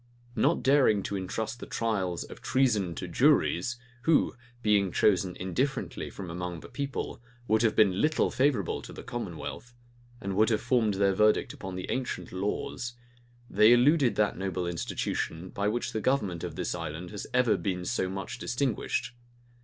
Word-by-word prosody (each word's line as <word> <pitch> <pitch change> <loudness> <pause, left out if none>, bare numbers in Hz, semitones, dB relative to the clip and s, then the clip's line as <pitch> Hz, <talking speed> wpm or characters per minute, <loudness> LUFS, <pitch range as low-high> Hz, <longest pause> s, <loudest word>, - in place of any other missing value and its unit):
Not 160 +5 +2
daring 130 -7 +4
to 100 - -3
intrust 110 +5 -3
the - - -8
trials 95 -7 -1
of - - -11
treason 110 -10 +1
to - - -5
juries, 120 +8 +3 0.2
who, 160 +3 +3 0.3
being 100 -3 +3
chosen 95 -2 +2
indifferently 125 +10 -2
from 90 -4 -7
among 90 -1 -5
the - - -11
people, 140 -4 -4 0.3
would 110 +1 +3
have 115 -2 +2
been 100 -3 +4
little 155 +1 +2
favorable 130 -8 +1
to - - -10
the - - -9
commonwealth, 120 +1 -6 0.4
and 100 -3 -3
would 110 +3 +4
have 110 -2 +2
formed 115 -4 +2
their 100 0 +3
verdict 105 +2 +3
upon 95 -1 -7
the 90 - -4
ancient 130 -1 -3
laws, 105 +5 -3 0.5
they 105 +2 +6
eluded 130 +1 +4
that 105 -3 +1
noble 95 -2 -2
institution, 85 0 -3
by 100 +2 -1
which 120 +3 -1
the 110 - -1
government 100 -10 0
of - - -5
this - - -2
island 85 +1 -5
has 105 - -6
ever 125 -3 +3
been 90 -3 -2
so 90 - 0
much 95 0 -5
distinguished. 125 -1 -1
105 Hz, 165 wpm, -29 LUFS, 95-120 Hz, 0.5 s, they